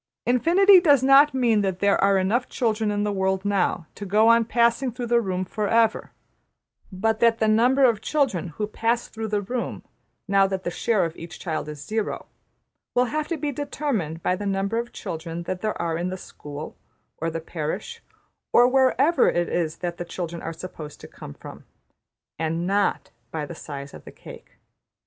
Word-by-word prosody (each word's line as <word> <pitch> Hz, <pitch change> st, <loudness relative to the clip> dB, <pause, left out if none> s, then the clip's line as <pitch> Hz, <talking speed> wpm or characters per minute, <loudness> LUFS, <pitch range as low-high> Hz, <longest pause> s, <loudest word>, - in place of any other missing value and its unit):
Infinity 355 Hz, -, +6 dB
does 290 Hz, -7 st, +4 dB
not 275 Hz, +2 st, +7 dB
mean 235 Hz, -5 st, +3 dB
that 190 Hz, -2 st, -1 dB
there 200 Hz, 0 st, +2 dB
are 195 Hz, 0 st, +4 dB
enough 215 Hz, +7 st, 0 dB
children 220 Hz, -3 st, 0 dB
in 205 Hz, 0 st, 0 dB
the 210 Hz, -, 0 dB
world 190 Hz, 0 st, -1 dB
now 195 Hz, -4 st, 0 dB
to -, -, -9 dB
go 210 Hz, +3 st, +3 dB
on 230 Hz, 0 st, +5 dB
passing 235 Hz, +2 st, +1 dB
through 245 Hz, +1 st, -5 dB
the 235 Hz, 0 st, +3 dB
room 185 Hz, -3 st, -2 dB
\emph{for 205 Hz, +2 st, -3 dB
ever}, 225 Hz, -1 st, +2 dB, 0.8 s
but 220 Hz, +4 st, 0 dB
that 230 Hz, -1 st, +4 dB
the 220 Hz, -, +1 dB
number 245 Hz, +5 st, +4 dB
of 235 Hz, -5 st, +4 dB
children 260 Hz, -, 0 dB
who 170 Hz, +6 st, -4 dB
pass 230 Hz, +3 st, -1 dB
through 220 Hz, 0 st, -5 dB
the 205 Hz, -1 st, -1 dB
room, 245 Hz, +4 st, -4 dB, 0.4 s
now 195 Hz, -1 st, +4 dB
that 190 Hz, -1 st, -4 dB
the 175 Hz, -, -2 dB
share 210 Hz, +1 st, +1 dB
of 165 Hz, 0 st, -5 dB
each 170 Hz, 0 st, -9 dB
child 155 Hz, -3 st, -3 dB
is 150 Hz, -1 st, -8 dB
0 220 Hz, 0 st, 0 dB
(zero), -, -, -6 dB, 0.7 s
will 250 Hz, -, +4 dB
have 305 Hz, 0 st, -1 dB
to 335 Hz, -, -2 dB
be 295 Hz, 0 st, -2 dB
determined 250 Hz, -, -3 dB
by 180 Hz, -, +1 dB
the 205 Hz, +2 st, -5 dB
number 195 Hz, +3 st, 0 dB
of 240 Hz, 0 st, -5 dB
children 165 Hz, +1 st, -6 dB
that 180 Hz, +1 st, -4 dB
there 215 Hz, -1 st, -2 dB
are 165 Hz, -1 st, -1 dB
in 175 Hz, +1 st, -2 dB
the 185 Hz, -, -4 dB
school, 150 Hz, -4 st, -9 dB, 0.4 s
or 165 Hz, -, -1 dB
the 165 Hz, 0 st, -4 dB
parish, 165 Hz, -, -5 dB, 0.5 s
or 245 Hz, -, +6 dB
wherever 270 Hz, +5 st, +3 dB
it 175 Hz, 0 st, 0 dB
is 165 Hz, -2 st, -1 dB
that 175 Hz, 0 st, -3 dB
the -, -, -4 dB
children 170 Hz, -1 st, -6 dB
are 165 Hz, -, -4 dB
supposed 160 Hz, -3 st, -9 dB
to -, -, -11 dB
come 70 Hz, -, -11 dB
from; -, -, -11 dB, 0.8 s
\emph{and 165 Hz, +1 st, -1 dB
not 200 Hz, +2 st, 0 dB, 0.2 s
by 155 Hz, +2 st, -4 dB
the 160 Hz, -, -8 dB
size 140 Hz, -3 st, -8 dB
of -, -, -11 dB
the -, -, -10 dB
cake}. -, -, -14 dB
205 Hz, 195 wpm, -24 LUFS, 175-240 Hz, 0.8 s, not